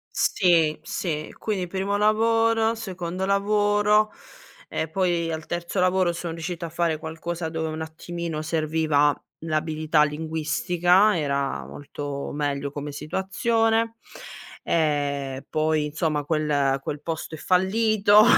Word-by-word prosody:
Sì, 165 -4 +3
sì. 155 -4 -3
Quindi 200 -4 -2
primo 195 +3 -1
lavoro, 225 +1 +3
secondo 185 -4 -4
lavoro 205 +1 +3 0.6
e 160 - -2
poi 170 -1 0
al 160 0 -5
terzo 175 +2 -2
lavoro 185 -1 +3
son 170 -1 -5
riuscita 170 +1 -4
a - - -7
fare 165 -1 0
qualcosa 165 +1 -4
dove 160 0 -2
un 155 0 -5
attimino 160 0 -5
serviva 155 -2 +2 0.3
l'abilità 155 -1 +1
linguistica 165 +5 +2
era 140 -2 -1
molto 145 -1 -6
meglio 140 -1 -2
come 145 0 -6
situazione. 225 +8 0 0.7
Ehm, 140 -4 0
poi 155 -1 +1
insomma 150 0 -1
quel 145 -3 +1
quel 145 +1 -4
posto 160 +1 -5
è - - -7
fallito, 205 +4 +4
165 Hz, 120 wpm, -25 LUFS, 155-190 Hz, 0.7 s, fallito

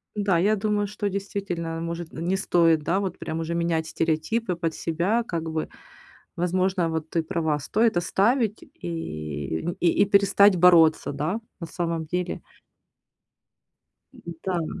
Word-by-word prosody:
Да, 200 -4 +2
я 205 +5 +3
думаю, 205 0 0
что 205 0 -3
действительно, 185 -4 -4
может, 170 0 -5
н 165 - -5
не 190 - +2
стоит, 165 -4 +3
да, 185 +6 +1
вот 190 -3 -3
прям 160 - -4
уже 165 +1 -3
менять 165 -1 0
стереотипы 165 +7 -1
под 165 -2 -2
себя 180 +8 0
как 165 -6 -4
бы. 160 0 -3 0.7
Возможно, 180 0 +1
вот 160 -1 -3
ты 165 -1 0
права. 160 -3 -1
Стоит 215 +7 +1
оставить 215 +5 +1
и 75 -3 -5
нь 175 +1 -3
и 175 - +2 0.2
и - - +2
перестать 200 0 +5
бороться, 165 -4 +5
да, 155 +10 -2 0.2
на 170 - -5
самом 165 -1 -3
деле. 180 +3 -3 2.0
Да. 175 -4 -1
170 Hz, 145 wpm, -25 LUFS, 160-195 Hz, 2.0 s, перестать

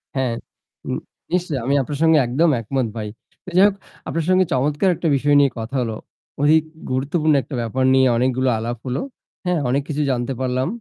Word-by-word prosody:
হ্যাঁ, 130 -3 0 0.6
নি - - -1 0.4
নিশ্চয়ই, 175 -6 0
আমি 135 - +1
আপনার 145 +2 -4
সঙ্গে 160 -1 +5
একদম 155 +8 +2
একমত 125 +2 -1
ভাই। 105 -1 -4 0.5
যাই 190 - +8
হোক 205 - -1 0.3
আপনার 165 -1 -2
সঙ্গে 185 0 +4
চমৎকার 145 +8 +1
একটা 165 - -2
বিষয় 145 +2 +2
নিয়ে 140 -2 +4
কথা 115 +5 -5
হল। 115 -2 -2 0.5
অধিক 155 +2 +5 0.3
গুরুত্বপূর্ণ 150 +4 +1
একটা 140 - -7
ব্যাপার 120 +3 -1
নিয়ে 130 0 +5
অনেকগুলো 130 +1 +1
আলাপ 120 +2 -3
হল। 130 0 -2 0.5
হ্যাঁ, 180 -2 +1
অনেক 135 +3 +1
কিছু 150 0 -1
জানতে 120 +1 -1
পারলাম। 130 0 0
135 Hz, 180 wpm, -21 LUFS, 125-155 Hz, 0.6 s, যাই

